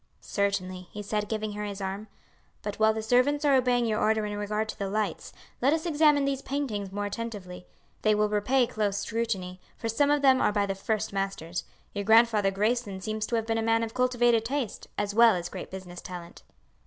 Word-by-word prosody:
"Certainly," 185 -3 -2
he 210 - -6
said, 210 0 -2
giving 215 -1 -2
her 210 0 -4
his 200 -1 -5
arm. 195 +2 -4 0.6
"But 205 -1 -4
while 220 0 +5
the 220 0 -4
servants 255 +6 +2
are 285 - +5
obeying 250 -2 +3
your 215 -2 0
order 220 0 +2
in 205 0 -4
regard 210 +1 -2
to - - -6
the 200 -1 -2
lights, 210 -3 -2 0.3
let 275 +4 +4
us 320 +1 -1
examine 300 -3 +4
these 275 -1 -1
paintings 230 -10 -3
more 205 +1 -3
attentively. 205 -4 -6 0.3
They 215 -1 +3
will 210 0 +2
repay 210 +5 +2
close 210 -3 -1
scrutiny, 205 -5 -3 0.2
for 230 - -3
some 285 +6 +2
of 290 -1 +2
them 265 -1 +5
are - - +3
by 205 -1 +1
the 195 - -1
first 215 +2 -2
masters. 180 -4 -3 0.3
Your 200 - -2
Grandfather 220 -1 +5
Grayson 210 0 -1
seems 215 +2 -3
to 235 - -1
have 225 -1 0
been 225 0 0
a - - 0
man 225 0 +2
of 225 0 -4
cultivated 240 -2 +3
taste, 255 -2 -3
as 205 0 -1
well 230 -1 +6
as 175 0 -4
great - - -7
business 185 -2 -8
talent." 175 -2 -9
215 Hz, 210 wpm, -28 LUFS, 200-235 Hz, 0.6 s, well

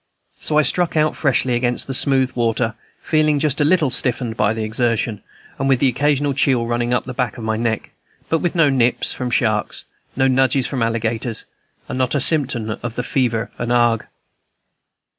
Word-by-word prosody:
So 150 - -1
I 155 - +5
struck 175 +1 0
out 155 0 +2
freshly 130 -3 +1
against 120 0 0
the 135 - -5
smooth 130 -1 +2
water, 115 -1 0 0.3
feeling 155 -2 +2
just 150 0 0
a - - +5
little 155 -3 +2
stiffened 120 -2 -1
by 105 -2 +2
the 110 0 -3
exertion, 115 -1 -1 0.4
and 135 0 0
with 130 -2 +3
an 135 - +5
occasional 145 +2 +1
chill 135 -4 +1
running 120 +1 -1
up 125 - +1
the - - -7
back 125 -1 -2
of 115 - -6
the 110 0 0
neck, 115 -1 -2 0.4
but 165 - +1
with 175 +2 -2
no 155 -4 +4
nips 125 -2 +2
from 125 -1 -4
sharks, 110 -3 -1 0.3
no 130 +1 +2
nudges 130 0 +2
from 130 -4 -3
alligators, 115 0 -1 0.4
and 130 - -4
not 130 +2 +1
a - - +2
symptom 125 -7 +1
of 120 -1 -5
fever 125 -2 -1
and 120 0 -2
ague. 120 -2 +2
125 Hz, 185 wpm, -19 LUFS, 115-140 Hz, 0.4 s, I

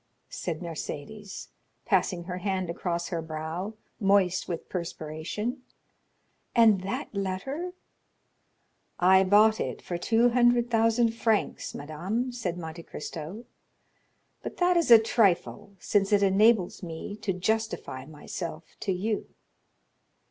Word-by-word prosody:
said 165 -2 -4
Mercédès, 175 +4 -6 0.4
passing 175 -3 +1
her 180 +1 -5
hand 185 -2 -1
across 170 0 -3
her 170 -3 -2
brow, 160 +6 -5 0.2
moist 195 -3 +3
with 170 -2 -4
perspiration; 170 - -4 0.9
"and 220 -5 +6
that 195 +3 -4
letter——" 240 - -3 1.3
"I 190 +2 +6
bought 215 +3 +5
it - - -3
for 175 -1 -5
two 230 +6 +3
hundred 240 0 +3
thousand 230 0 +3
francs, 225 -2 0
madame," 185 - -3
said 195 -8 -3
Monte 165 -1 -7
Cristo; 165 +8 -7 1.0
"but - - -7
that 360 0 +3
is 340 -5 +2
a 230 - +11
trifle, 205 -2 +1
since 195 +2 +1
it 205 -1 +4
enables 200 0 +3
me 170 +3 -6
to 205 - -2
justify 190 - -2
myself 155 +1 -7
to 195 - -1
you." 205 +4 -1
195 Hz, 120 wpm, -28 LUFS, 170-225 Hz, 1.3 s, a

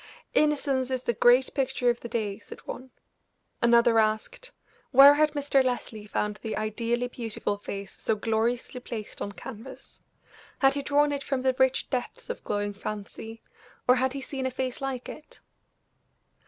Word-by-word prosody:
"'Innocence' 280 -4 +2
is 255 -1 -2
the 235 - 0
great 245 +4 +4
picture 265 -2 +1
of 240 - -5
the 235 - -7
day," 215 -3 -2
said - - -11
one. 260 +1 -7 0.7
Another 235 -1 +5
asked: 220 - -1 0.4
"Where 275 +2 +9
had 300 0 +2
Mr. 280 -2 +2
Leslie 230 -4 -3
found 210 0 -2
the 220 0 -4
ideally 230 +3 -1
beautiful 230 -4 -3
face 200 -1 -7
so 220 - +1
gloriously 230 +4 -1
placed 225 -3 -7
on 200 - -3
canvas? 225 +5 -11 0.6
Had 270 -1 +4
he 280 - -2
drawn 290 +1 +2
it 285 -1 -2
from 265 -2 -2
the 260 -1 +2
rich 260 0 +3
depths 470 - -3
of 485 - -8
glowing 205 0 -2
fancy, 215 +2 -7 0.4
or 250 +1 +6
had 260 +1 +1
he 275 - -5
seen 265 -1 -3
a - - 0
face 255 0 -4
like 265 -2 -3
it?" 305 - -10
245 Hz, 165 wpm, -27 LUFS, 220-270 Hz, 0.7 s, Where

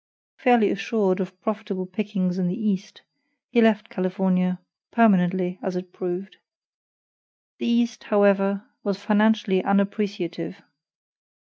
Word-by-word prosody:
Fairly 240 -5 +4
assured 200 -2 0
of 185 -1 -5
profitable 210 -3 -3
pickings 185 -1 -2
in 180 - +1
the 185 +5 -3
East, 210 -2 -3 0.5
he 240 -2 +4
left 220 -1 +3
California 185 -1 0 0.3
(permanently, 185 -5 +3
as 190 -1 -3
it 180 0 -6
proved). 185 +1 -5 1.2
The - - -2
East, 235 -1 0
however, 200 -1 +3 0.2
was 200 -2 -1
financially 210 -2 +2
unappreciative. 200 -4 -1
195 Hz, 110 wpm, -24 LUFS, 185-215 Hz, 1.2 s, Fairly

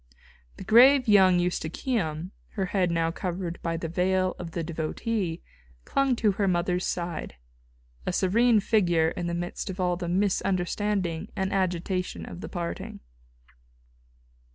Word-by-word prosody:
The - - -8
grave 250 +6 +6
young 190 -4 +6
Eustochium, 175 - -2 0.2
her 195 -3 -1
head 185 -1 +1
now 165 -1 +1
covered 175 -1 -4
by 165 -1 -2
the 165 - -4
veil 185 +2 +1
of 165 -2 -7
the 170 - -2
devotee, 165 +3 -3 0.4
clung 275 -2 +1
to 220 -3 +2
her 195 +1 0
mother's 180 0 0
side, 170 - -4 0.7
a - - +2
serene 215 +5 +3
figure 175 -7 +2
in 175 +1 -4
the 170 - -2
midst 175 +3 -4
of 190 0 -6
all 180 -1 +1
the 175 -1 -4
misunderstanding 185 -1 0
and 190 0 -1
agitation 185 -1 -1
of 175 - -9
the - - -6
parting. 170 -2 -5
180 Hz, 140 wpm, -27 LUFS, 170-200 Hz, 0.7 s, grave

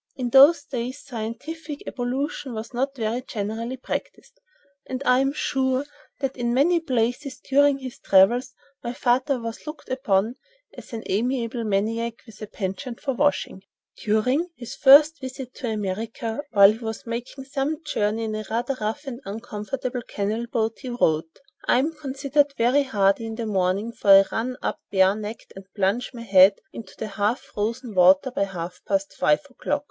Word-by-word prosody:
In 250 -2 -3
those 285 +5 +7
days 260 -1 -5
scientific 285 +6 -6
ablution 260 +1 -3
was 220 +4 -6
not 270 +3 -1
very 230 0 -2
generally 230 +1 -4
practised, 265 - -6 0.5
and 260 +1 -4
I 250 +1 +5
am 270 +1 +2
sure 265 -2 0 0.4
that 270 -1 -1
in 240 -1 -1
many 335 +6 +4
places 255 -1 -1
during 285 0 +3
his 260 -2 -8
travels 235 +7 +4 0.3
my 240 0 -3
father 255 +2 +1
was 230 +4 -7
looked 305 +1 -8
upon 235 -3 0 0.4
as - - -12
an 225 -2 -5
amiable 235 +2 -1
maniac 225 +3 -1
with 225 -3 -15
a 215 - -5
penchant 205 +5 -5
for 270 - -2
washing. 285 -7 0 0.3
During 250 +11 +1
his 240 -4 -8
first 295 +4 +7
visit 260 -1 -7
to 250 - -4
America, 220 +3 -3
while 200 -4 +7
he 220 - -6
was 225 -2 -5
making 240 +3 -5
some 285 +4 -3
journey 220 -6 -1
in 220 -1 -3
a 215 0 -3
rather 240 +4 -1
rough 220 +8 -3
and 265 -2 -6
uncomfortable 240 +4 -5
canal 215 +4 -2
boat, 225 -1 -1
he 260 - -7
wrote: 160 - 0 0.3
"I - - +4
am 295 +6 +1
considered 285 -1 0
very 245 +5 +4
hardy 210 -4 +1
in 225 - -5
the 230 0 -4
morning, 195 +2 0
for 210 - -3
I 195 0 +9
run 250 +3 -2
up - - -2
barenecked 205 +3 0
and 195 0 -12
plunge 200 +4 0
my 235 -2 -8
head 195 -2 +6 0.2
into 200 -5 -10
the - - -4
half 205 +4 0
frozen 230 +3 -4
water 185 +7 +5
by 200 - 0
half 180 -2 -7
past 195 -1 0
five 300 0 +2
o'clock. 290 +2 -2
235 Hz, 170 wpm, -24 LUFS, 215-270 Hz, 0.5 s, I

